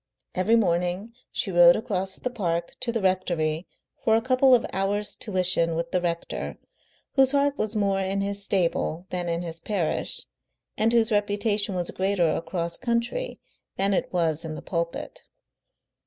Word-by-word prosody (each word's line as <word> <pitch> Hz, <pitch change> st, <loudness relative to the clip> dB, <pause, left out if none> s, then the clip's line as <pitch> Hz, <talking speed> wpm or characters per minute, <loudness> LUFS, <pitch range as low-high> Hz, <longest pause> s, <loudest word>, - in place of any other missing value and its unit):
Every 195 Hz, +5 st, +3 dB
morning 180 Hz, +1 st, 0 dB, 0.2 s
she 195 Hz, -, -1 dB
rode 175 Hz, 0 st, +7 dB
across 190 Hz, -3 st, -2 dB
the 250 Hz, -, -4 dB
park 170 Hz, -7 st, -2 dB
to 250 Hz, -2 st, -1 dB
the 230 Hz, -3 st, -2 dB
rectory 175 Hz, -3 st, 0 dB, 0.4 s
for 220 Hz, -, +4 dB
a 225 Hz, -, +3 dB
couple 255 Hz, +1 st, +5 dB
of 240 Hz, -, +1 dB
hours' 200 Hz, +2 st, 0 dB
tuition 180 Hz, -5 st, +2 dB
with 170 Hz, +1 st, -3 dB
the 180 Hz, -, +1 dB
rector, 170 Hz, -1 st, -3 dB, 0.6 s
whose 265 Hz, 0 st, +4 dB
heart 285 Hz, 0 st, +2 dB
was 220 Hz, -4 st, -1 dB
more 200 Hz, -2 st, +1 dB
in 195 Hz, +1 st, -1 dB
his 200 Hz, 0 st, -2 dB
stable 175 Hz, -3 st, 0 dB
than 180 Hz, -1 st, -2 dB
in 170 Hz, +1 st, -1 dB
his 165 Hz, -1 st, -3 dB
parish, 180 Hz, -3 st, -2 dB, 0.5 s
and 220 Hz, +1 st, +2 dB
whose 230 Hz, -1 st, +3 dB
reputation 205 Hz, -1 st, +1 dB
was 175 Hz, -1 st, -2 dB
greater 190 Hz, -4 st, +1 dB
across 170 Hz, 0 st, -3 dB
country 235 Hz, -, -2 dB, 0.4 s
than 195 Hz, +1 st, +3 dB
it -, -, 0 dB
was 165 Hz, -3 st, 0 dB
in 160 Hz, -1 st, -5 dB
the -, -, -8 dB
pulpit. 170 Hz, -1 st, -4 dB
190 Hz, 160 wpm, -26 LUFS, 170-220 Hz, 0.6 s, rode